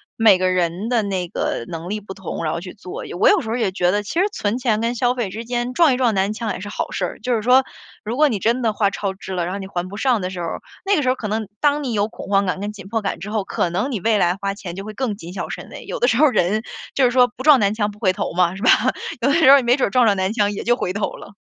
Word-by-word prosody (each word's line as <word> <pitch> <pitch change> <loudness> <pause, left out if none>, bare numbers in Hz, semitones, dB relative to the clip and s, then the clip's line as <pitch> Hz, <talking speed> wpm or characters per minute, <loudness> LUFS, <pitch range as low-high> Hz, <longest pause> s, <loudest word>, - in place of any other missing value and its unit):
每 220 -4 +6
个 185 0 +1
人 180 +3 -1
的 240 -2 +2
那 190 -3 -2
个 115 - -2
能 165 +1 -6
力 210 +2 -2
不 200 -2 -9
同， 190 -3 -6
然 155 - -1
后 - - -2
去 180 +1 -9
做。 190 -4 -8
也 - - -8
我 175 - +3
有 - - +5
时 220 - -6
候 225 - -1
也 220 -6 0
觉 180 -2 +1
得， 205 +3 +1
其 270 +11 -3
实 385 - +3
存 215 - -2
钱 230 -4 +1
跟 230 +1 0
消 245 +1 +1
费 235 -6 -2
之 225 +4 -6
间， 240 +1 -2
撞 305 -3 +4
一 - - -3
撞 245 -3 +2
南 195 +1 +1
墙 220 0 -3
也 - - -6
是 205 +2 -7
好 - - -4
事 - - -1
儿。 - - -7
就 250 - 0
是 225 - 0
说， 250 +4 +5 0.4
如 225 +3 -2
果 300 0 +5
你 225 - -1
真 235 +6 +1
的 225 -2 +2
花 205 -1 +1
超 195 -1 -3
支 190 0 -8
了， 175 -2 -1
然 175 - -3
后 - - -3
你 195 - -6
还 180 -1 -4
不 200 - -8
上 245 -2 +1
的 180 - -2
时 185 -1 -7
候， 170 - -3 0.4
那 400 +1 +3
个 300 - +1
时 255 - +1
候 255 - +2
可 220 - -5
能 215 0 -2
当 290 0 +2
你 260 - -2
有 205 -1 +1
恐 - - -10
慌 200 0 +3
感 185 0 -2
跟 205 +1 -3
紧 195 -3 -11
迫 225 +2 -1
感 200 - -2
之 210 - -7
后， 215 -2 0
可 175 - -1
能 245 +11 -1
你 225 - -2
未 220 +2 +2
来 175 -1 +2
花 195 0 -3
钱 185 -4 -8
就 195 +1 -7
会 215 - -7
更 235 -2 -2
谨 175 -3 -10
小 - - -5
慎 - - -7
微， - - -9
有 - - -4
的 - - +3
时 - - +2
候 305 - +6
人 210 -2 +1 0.3
就 275 - +1
是 250 - +5
说 250 0 +4
不 250 - -8
撞 295 -2 +7
南 200 0 +2
墙 210 -1 -1
不 205 - -12
回 195 -3 +2
头 - - -3
嘛， 180 0 +2
是 195 - -9
吧？ 245 - +3 0.5
有 255 - +2
的 - - +3
时 320 -4 +5
候 280 - +10
你 270 - +1
没 240 +1 +4
准 265 - 0
撞 245 +4 +3
上 205 -3 +4
南 190 0 0
墙 205 -3 +1
也 205 - -5
就 240 - +3
回 185 -7 -3
头 205 +1 -2
了。 - - -11
210 Hz, 360 characters per minute, -21 LUFS, 190-245 Hz, 0.5 s, 候